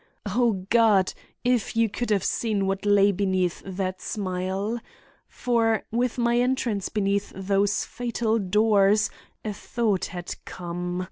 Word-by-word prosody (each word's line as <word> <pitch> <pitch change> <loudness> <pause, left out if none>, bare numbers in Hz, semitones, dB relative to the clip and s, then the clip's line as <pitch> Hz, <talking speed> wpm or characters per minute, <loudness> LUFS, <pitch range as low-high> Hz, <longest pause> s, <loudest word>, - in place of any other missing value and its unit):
O 210 -2 +1
God! 215 -5 +4 0.3
if 245 -3 +1
you 230 0 +4
could 240 +3 -4
have 200 -3 +2
seen 210 -3 0
what 195 +1 -2
lay 205 0 +5
beneath 185 -2 0
that 185 -1 -4
smile! 195 +3 -2 0.5
For, 225 -3 +1
with 240 +2 0
my 240 0 +2
entrance 245 -5 0
beneath 200 -1 0
those 195 +1 +1
fatal 235 -2 -1
doors 210 +1 +3 0.3
a 215 - -2
thought 210 -2 -1
had 175 0 -6
come. 175 0 -5
205 Hz, 130 wpm, -25 LUFS, 190-230 Hz, 0.5 s, lay